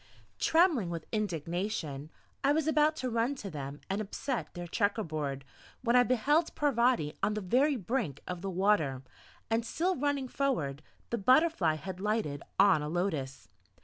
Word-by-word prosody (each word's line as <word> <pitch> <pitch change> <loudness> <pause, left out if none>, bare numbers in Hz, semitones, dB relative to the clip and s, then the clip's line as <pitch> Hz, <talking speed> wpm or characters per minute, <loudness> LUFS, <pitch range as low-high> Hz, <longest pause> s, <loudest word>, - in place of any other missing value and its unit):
Trembling 320 - +3
with 165 -2 -5
indignation, 170 -6 -3 0.3
I 280 +1 +4
was 310 -1 +1
about 310 0 +3
to 255 -4 -3
run 235 +4 +1
to 205 -7 -7
them 140 -1 -6
and 195 +2 -1
upset 235 +5 -3
their 175 0 -5
checker 200 +4 0
board, 145 -4 -4 0.4
when 235 0 +2
I 250 - +8
beheld 275 +7 +2
Parvati 240 - +2
on 210 - +1
the - - -1
very 260 +10 +2
brink 215 - -2
of 180 -1 -5
the 195 - -3
water, 175 -9 +1 0.5
and 225 +1 +2
still 350 +10 0
running 285 -1 -1
forward 165 - -1 0.3
the 235 - 0
butterfly 255 - +4
had 185 +4 -7
lighted 210 -9 -1 0.2
on 195 -5 +5
a 150 - -3
lotus. 155 -7 -2
210 Hz, 160 wpm, -31 LUFS, 160-260 Hz, 0.5 s, I